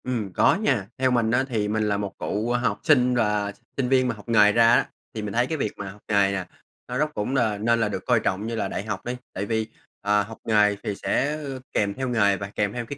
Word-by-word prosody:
Ừm, 115 -7 -3
có - - +4
nha. 130 - 0
Theo 130 0 +2
mình 115 -2 +2
á 120 +2 +3
thì 110 -4 0
mình 110 +1 0
là 105 -1 +1
một 100 -1 -4
cựu 110 +4 -1
học 120 0 0
sinh 125 -5 +4
và 105 -3 +1 0.3
sinh 130 -3 0
viên 130 -1 +3
mà 120 - -1
học 105 +2 -13
nghề 105 -3 +6
ra 115 +1 +5
á, - - +3 0.2
thì 110 - -4
mình 105 -1 -4
thấy 120 +2 +2
cái 160 - -2
việc 105 -7 -1
mà 100 - -5
học 105 +2 -16
nghề 100 -2 +3
nè, 95 -2 -2 0.4
nó 125 - -3
rất 150 +2 0
cũng 105 +5 -2
n - - +3 0.3
nên 115 0 +3
là 110 -2 +1
được 95 -2 -5
coi 120 -3 +3
trọng 100 +1 -1
như 115 - -3
là 110 - -1
đại - - -4
học 100 -3 -5
đi. 125 +1 -2 0.2
Tại 100 - -3
vì, 110 0 -1 0.3
à, 105 0 +2
học 110 +2 -10
nghề 105 -2 +4
thì 100 - -2
sẽ 145 +8 0 0.4
kèm 100 -1 +1
theo 130 +3 -3
nghề 100 -5 +3
và 100 0 -6
kèm 105 -1 0
theo 120 -1 -4
cái 140 +4 -7
110 Hz, 270 wpm, -24 LUFS, 105-125 Hz, 0.4 s, nghề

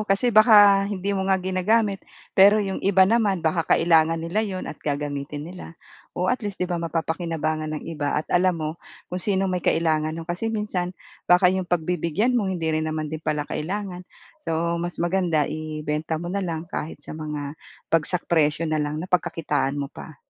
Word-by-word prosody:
kasi 225 +5 +2
baka 205 -3 +7
hindi 200 0 -2
mo 190 -1 -1
nga 190 - +4
ginagamit 195 +3 +1 0.3
pero 200 +2 +7
'yong 195 -2 -1
iba 190 -1 +5
naman 200 -5 +1
baka 165 +1 +2
kailangan 165 -1 +4
nila 170 +6 -1
'yon 195 -4 -3
at - - -8
gagamitin 145 0 -3
nila. 175 -1 -10 0.4
Oh, 180 +1 0
at 255 - -2
least 205 -3 -5
'di - - +2
ba 175 -1 -2
mapapakinabangan 160 -2 -2
ng - - -7
iba 145 -3 -2
at 150 - 0
alam 180 0 +3
mo 155 -1 -2 0.4
kung 180 - -2
sinong 195 -1 0
may 180 - -1
kailangan 155 -1 +1
no'n. 165 - -6
Kasi 180 +6 -2
minsan 195 -5 -2 0.3
baka 180 +1 +6
'yong 185 -2 -2
pagbibigyan 175 +6 0
mo 215 -6 +1
hindi 175 -3 -3
rin 155 0 0
naman 155 -1 -3
din 155 - -4
pala 150 -2 -1
kailangan 180 +3 -5 0.3
so, 170 - -1
mas 175 0 -4
maganda 170 -3 +1
ibenta 155 0 -3
mo 175 +3 -5
na 200 - -1
lang 165 -4 -3
kahit 160 -2 -5
sa - - -8
mga 150 -2 -5 0.4
bagsak 165 +2 +1
presyo 155 -1 +2
nalang. 155 0 -1
Napagkakitaan 165 -6 0
mo 140 0 -4
pa. 155 - -10
170 Hz, 180 wpm, -24 LUFS, 155-190 Hz, 0.4 s, baka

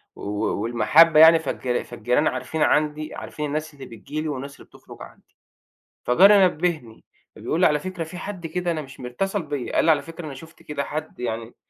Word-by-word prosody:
و - - -13
و 105 0 -2
والمحبة 145 +8 +4
يعني 160 +1 +8
فالجر 130 -4 -3
فالجيران 120 +5 0
عارفين 130 +5 -3
عندي 150 +1 +1
عارفين 150 - -6
الناس 155 +1 -4
اللي 140 - -11
بتيجي 145 +7 -7
لي 155 - -4
والناس 140 -1 -5
اللي - - -16
بتُخرُج - - -16
عندي - - -15 0.7
فجَاري 195 +9 +6
نبّهني 155 -9 -3 0.3
فبيقول 165 - -3
لي: - - +6
"على 150 -1 +2
فكرة 185 -2 -5
في 175 +3 -9
حد 185 -3 -6
كده 175 +2 -2
أنا 155 -2 -2
مش 135 -1 -13
مر" 125 - -6
اتصَل 195 - -2
بيّا 145 -4 -5
قال - - +3
لي: 165 - +4
"على 145 -3 +3
فكرة 165 +1 -9
أنا 140 - -7
شُفت 160 +4 -14
كده 145 -2 -4
حد 155 -3 -6
يعني 115 -1 -4
150 Hz, 205 wpm, -23 LUFS, 130-165 Hz, 0.7 s, يعني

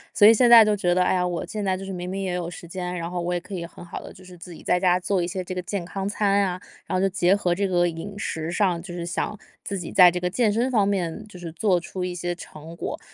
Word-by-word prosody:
所 205 - +8
以 225 - +9
现 240 +2 +4
在 230 -2 +10
就 210 0 +2
觉 180 -3 +1
得， 180 - +4
哎 - - +2
呀， 180 -1 +1
我 175 -1 -3
现 210 -1 -5
在 190 -1 0
就 195 - -7
是 195 - -5
明 180 0 -5
明 190 +1 -3
也 185 -2 -2
有 175 -1 -3
时 170 0 -10
间， 180 +1 -4
然 170 0 -4
后 180 0 -3
我 175 +1 -2
也 - - 0
可 180 - -12
以 175 -3 -3
很 175 - -13
好 170 - -7
地 - - -10
就 185 - -15
是 180 0 -12
自 175 +1 -11
己 165 - -11
在 180 - +2
家 180 -1 +3
做 185 +1 0
一 175 - -1
些 185 +1 -4
这 185 - -6
个 180 - -3
健 180 0 -4
康 195 +2 -4
餐 200 -1 +2
呀， 185 -2 0 0.3
然 - - 0
后 - - +1
就 195 - +3
结 185 0 +2
合 180 -4 0
这 200 +3 0
个 175 -1 +2
饮 170 +5 -6
食 160 -5 -3
上， 175 -2 +1
就 180 - -9
是 170 -1 -4
想 210 +4 -3 0.3
自 200 - -4
己 175 - -6
在 180 -2 +8
这 180 +1 -2
个 180 - -1
健 215 +4 +1
身 240 +5 0
方 210 -5 +3
面 190 0 -2
就 185 - -12
是 170 -2 -7
做 180 +2 +1
出 180 +2 -6
一 180 -1 -3
些 175 0 -2
成 165 -2 -11
果。 - - -5
180 Hz, 340 characters per minute, -24 LUFS, 175-195 Hz, 0.3 s, 在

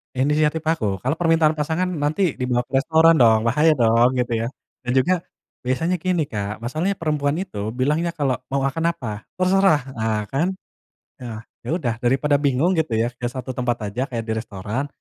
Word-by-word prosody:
Inisiatif 150 +4 +1
aku. 145 - -1
Kalau 135 +6 -1
permintaan 165 -2 +3
pasangan 160 +5 0
nanti 155 +1 0
dibawa 125 -1 0
ke 135 - +1
restoran 160 +3 +5
dong, 110 -3 +5
bahaya 155 +5 +4
dong, 120 0 +3
gitu 120 -2 -1
ya. - - -1 0.4
Dan 125 - 0
juga 170 +7 +2 0.4
biasanya 165 +8 0
gini, 175 -3 -1
Kak, 105 0 -4
masalahnya 155 +11 -1
perempuan 150 -5 -1
itu 110 - -5
bilangnya 150 +7 0
kalau 135 -4 0
mau 135 +1 -1
akan 165 +5 0
apa, 110 -7 -7
"Terserah!" 185 -5 +3 0.2
Ah, 110 -1 0
kan! 165 - 0 0.7
E 125 - -8
ah. 110 -1 -6 0.2
Ya 160 - 0
udah, 120 -10 -1
daripada 135 +4 +2
bingung, 140 +4 +2
gitu 150 -8 0
ya. 115 +2 +1
Ke 120 - -2
satu 130 +1 -5
tempat 120 -4 -2
aja 125 +6 -2
kayak 120 -4 -4
di 110 0 -3
restoran, 110 +4 -4
135 Hz, 180 wpm, -22 LUFS, 120-160 Hz, 0.7 s, restoran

